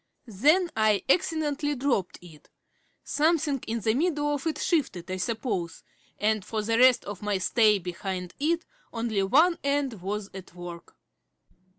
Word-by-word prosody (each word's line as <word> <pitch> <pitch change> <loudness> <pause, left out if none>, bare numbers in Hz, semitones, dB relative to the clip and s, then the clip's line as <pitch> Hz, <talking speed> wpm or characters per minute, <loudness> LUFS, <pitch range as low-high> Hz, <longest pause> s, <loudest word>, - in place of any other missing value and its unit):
Then 300 - +2
I 215 -2 +2
accidentally 295 -3 +1
dropped 245 -9 -1
it; 160 -4 -16 0.5
something 300 -3 +1
in 230 0 -2
the 220 +2 +2
middle 295 0 0
of 290 +2 -3
it 315 - -1
shifted, 260 - -1
I 185 - -2
suppose 190 -5 -3 0.3
and 215 -1 +1
for 215 +2 -3
the 230 +2 +1
rest 255 -1 +5
of 205 -2 -7
my 205 -1 0
stay 210 +2 +3
behind 180 0 -5
it 330 +4 0 0.3
only 225 -3 -1
one 310 - +4
end 280 -7 -1
was 200 +2 -4
at 185 -2 -11
work. 175 -1 -9
225 Hz, 150 wpm, -27 LUFS, 195-290 Hz, 0.5 s, rest